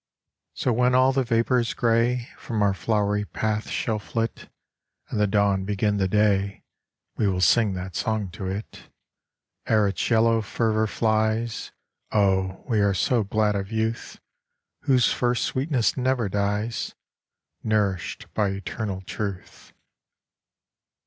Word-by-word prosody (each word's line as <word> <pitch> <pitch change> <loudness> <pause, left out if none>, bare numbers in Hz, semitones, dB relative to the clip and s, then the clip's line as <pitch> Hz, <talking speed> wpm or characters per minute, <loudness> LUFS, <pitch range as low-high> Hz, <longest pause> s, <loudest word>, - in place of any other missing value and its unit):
47 - - -48
So 125 - 0
when 125 0 +4
all 130 +1 +5
the 135 0 +2
vapours 115 0 +1
grey 120 +1 +1
From 110 -3 -2
our 100 -1 +3
flowery 105 0 0
paths 110 +1 -2
shall 110 -2 -1
flit, 115 +2 -4 0.6
And - - -2
the 105 - +3
dawn 100 -1 +2
begin 105 +1 0
the 95 -1 +1
day, 100 -1 +1 0.5
We 105 - +2
will 95 -2 0
sing 100 +4 +4
that 90 0 -6
song 110 -4 -1
to 95 +1 -6
it 100 +3 -6 0.8
Ere 110 -2 +3
its 95 -4 -2
yellow 115 -1 +4
fervour 110 0 0
flies. 110 +1 0 0.4
Oh, 95 -2 +1
we 115 -5 +1
are 100 -1 +2
so 115 +4 +2
glad 105 +1 +1
of 100 +1 -3
youth, 110 +1 -2 0.7
Whose 130 -4 +4
first 120 -1 0
sweetness 130 -3 0
never 130 -3 0
dies 105 +3 -2 0.7
Nourished 105 -4 -1
by 105 -2 +1
eternal 95 0 -4
truth. 95 0 -6
110 Hz, 135 wpm, -25 LUFS, 100-115 Hz, 0.8 s, all